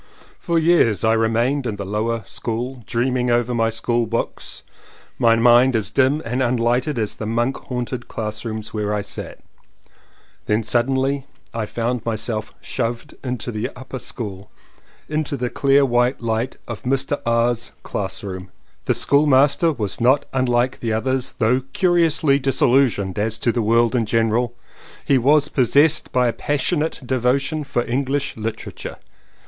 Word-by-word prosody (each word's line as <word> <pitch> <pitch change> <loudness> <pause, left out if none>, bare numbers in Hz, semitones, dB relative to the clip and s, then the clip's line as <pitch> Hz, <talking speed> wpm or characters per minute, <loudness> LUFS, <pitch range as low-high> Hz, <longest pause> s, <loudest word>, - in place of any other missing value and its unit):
For 170 -1 0
years 160 - +3
I 110 0 +4
remained 115 +4 +1
in 110 - -2
the 100 -1 -5
lower 110 +3 -1
school 120 +4 -4
dreaming 125 +1 0
over 120 0 +1
my 115 -1 +2
school 115 +1 0
books, 115 +2 -3 0.6
my 115 -1 +5
mind 120 +2 +5
as 105 -3 -1
dim 140 +3 +2
and 125 +3 -1
unlighted 125 +3 +1
as 110 -2 -1
the 105 - -6
monk 120 +4 0
haunted 125 -1 -5
classrooms 110 0 -5
where 105 -1 -1
I 105 - -2
sat; - - -8 1.1
then 105 +2 +1
suddenly 130 +4 0 0.3
I 115 -2 -2
found 120 +1 -2
myself 110 0 -3
"shoved" 115 -2 -4
into 125 -2 -3
the 110 0 -3
upper 130 +1 -7
school, 100 -5 -6 0.6
into 155 -2 -2
the 125 -1 -2
clear 140 0 +3
white 120 +1 +1
light 115 +2 -2
of 115 -4 -6
Mr. 135 +2 0
R.'s 115 0 +1
classroom. 95 -2 -5 0.4
The - - +2
schoolmaster 145 +3 +4
was 110 -7 -3
not 130 +4 +4
like 125 -1 +1
the 115 -2 -1
others 130 +3 -1
— - - -35
though 125 +3 +2
curiously 165 -5 +3
dis 135 0 0
illusioned 120 -7 +2
as 110 +1 -1
to 120 - +1
the 120 - -1
world 115 +2 +3
in 115 -3 +1
general, 115 +2 +1 0.5
he 135 -2 +3
was 145 +4 +4
possessed 145 +4 +3
by 125 -1 +2
a 115 - 0
passionate 150 +3 -1
devotion 135 +5 0
for 125 -4 -1
English 140 +3 -1
Literature. 110 0 -6
120 Hz, 150 wpm, -21 LUFS, 115-135 Hz, 1.1 s, my